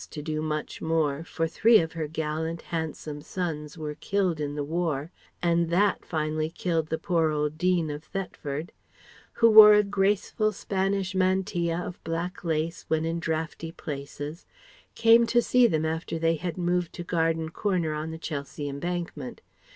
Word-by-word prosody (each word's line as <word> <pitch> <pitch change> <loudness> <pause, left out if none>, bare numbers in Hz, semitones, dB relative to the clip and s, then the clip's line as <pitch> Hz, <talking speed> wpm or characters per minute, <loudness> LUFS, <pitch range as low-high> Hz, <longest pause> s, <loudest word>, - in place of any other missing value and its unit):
to 150 - -7
do 155 0 -2
much 155 -1 -3
more, 160 -2 0
for 165 0 -2
three 225 +7 +5
of 160 -1 -2
her 160 -2 -3
gallant, 160 +1 -3
handsome 155 -2 -4
sons 155 -2 -4
were 150 -1 -4
killed 175 +1 -1
in 145 -1 -3
the 145 - -2
War, 160 -1 -2 0.3
and 170 -1 +2
that 195 +4 +2
finally 155 -1 -1
killed 165 -2 -1
the 160 - -1
poor 165 -3 +1
old 150 0 -1
Dean 180 -4 +2
of 150 +1 -6
Thetford), 165 -5 -5 0.6
who 230 - +5
wore 210 -1 +11
a 210 - +5
graceful 205 +2 +1
Spanish 195 0 -1
mantilla 185 -3 +1
of 180 - -7
black 165 +3 -4
lace 165 0 -1
when 160 0 +1
in 165 +1 -1
draughty 160 0 -3
places, 145 0 -7 0.5
came 230 +1 +6
to 240 - +4
see 245 0 +4
them 160 -5 0
after 160 +1 -2
they 165 0 +2
had 175 +2 -4
moved 175 -1 0
to 175 - -6
Garden 165 -1 0
Corner 175 -3 -1
on 155 +1 -3
the 160 - -6
Chelsea 145 -2 -5
Embankment. 150 -1 -4
165 Hz, 165 wpm, -27 LUFS, 155-180 Hz, 0.6 s, wore